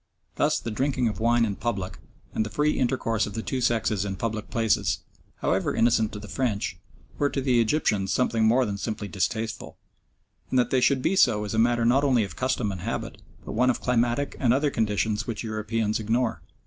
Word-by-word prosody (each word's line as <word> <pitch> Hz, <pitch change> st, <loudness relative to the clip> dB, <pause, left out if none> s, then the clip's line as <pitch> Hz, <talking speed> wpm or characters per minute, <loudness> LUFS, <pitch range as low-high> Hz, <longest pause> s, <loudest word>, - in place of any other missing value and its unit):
Thus -, -, +1 dB
the 115 Hz, -, -5 dB
drinking 130 Hz, +2 st, 0 dB
of 105 Hz, -, -6 dB
wine 115 Hz, +1 st, +3 dB
in 100 Hz, -3 st, -2 dB
public, 100 Hz, -6 st, -3 dB, 0.3 s
and -, -, +1 dB
the 110 Hz, -, -5 dB
free 150 Hz, +8 st, +1 dB
intercourse 120 Hz, -4 st, 0 dB
of 105 Hz, -, -8 dB
the 115 Hz, -, -3 dB
two 130 Hz, -, -2 dB
sexes 110 Hz, -4 st, +1 dB
in 100 Hz, -2 st, -3 dB
public 110 Hz, +1 st, -3 dB
places, 115 Hz, -2 st, +1 dB, 0.4 s
however -, -, 0 dB
innocent 115 Hz, -2 st, +3 dB
to 105 Hz, -, -5 dB
the 105 Hz, -, -9 dB
French, 105 Hz, -8 st, -2 dB, 0.4 s
were 145 Hz, -, +2 dB
to 140 Hz, -, -2 dB
the 130 Hz, -3 st, +3 dB
Egyptians 110 Hz, -6 st, +1 dB
something 115 Hz, -3 st, +1 dB
more 120 Hz, +4 st, +4 dB
than 100 Hz, -2 st, -4 dB
simply 110 Hz, -1 st, -4 dB
distasteful; 110 Hz, +3 st, -3 dB, 0.7 s
and 130 Hz, -, +1 dB
that 125 Hz, -, +2 dB
they 130 Hz, -, +3 dB
should 130 Hz, 0 st, +3 dB
be 195 Hz, -, +2 dB
so 110 Hz, -, +4 dB
is 105 Hz, -, -4 dB
a 110 Hz, -, +1 dB
matter 120 Hz, 0 st, +3 dB
not 130 Hz, +4 st, +4 dB
only 130 Hz, -5 st, +3 dB
of 95 Hz, -5 st, -6 dB
custom 125 Hz, -5 st, 0 dB
and 95 Hz, -3 st, -6 dB
habit, -, -, -4 dB, 0.2 s
but -, -, -6 dB
one 125 Hz, -, +2 dB
of 125 Hz, -, +1 dB
climatic 120 Hz, +3 st, 0 dB
and 125 Hz, -2 st, +3 dB
other 145 Hz, +1 st, +1 dB
conditions 105 Hz, -1 st, 0 dB
which 115 Hz, -1 st, -4 dB
Europeans 110 Hz, 0 st, -1 dB
ignore. 115 Hz, +2 st, 0 dB
115 Hz, 205 wpm, -26 LUFS, 105-125 Hz, 0.7 s, more